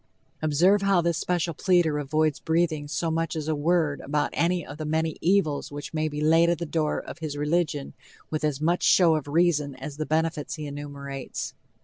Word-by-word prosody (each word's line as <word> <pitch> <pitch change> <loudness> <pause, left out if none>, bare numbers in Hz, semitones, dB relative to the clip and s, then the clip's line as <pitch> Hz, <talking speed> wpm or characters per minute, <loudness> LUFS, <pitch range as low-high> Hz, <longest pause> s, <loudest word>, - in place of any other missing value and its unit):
Observe 170 +7 +3
how 195 -2 +3
this 170 -1 0
special 175 -2 -1
pleader 170 -3 +2
avoids 155 +1 0
breathing 160 -2 0
so 165 +3 -1
much 165 0 -1
as 155 -1 -4
a 160 - +1
word 155 -1 +1
about 145 +1 -1
any 175 0 +1
of 145 +2 -10
the - - -3
many 160 +1 -1
evils 170 -7 +1
which 145 +2 -7
may 155 0 0
be 150 -1 -4
laid 165 +2 +4
at 170 - +1
the 170 - -4
door 155 -1 0
of - - -9
his 155 -3 -4
religion 150 -1 -1 0.4
with 155 -1 -2
as 150 -3 0
much 170 +3 +1
show 175 -3 +5
of 150 -2 -3
reason 150 -3 +2
as 150 -2 -8
the 155 - -2
benefits 160 -1 -1
he 155 -2 -6
enumerates. 140 -2 -6
155 Hz, 200 wpm, -26 LUFS, 145-170 Hz, 0.4 s, show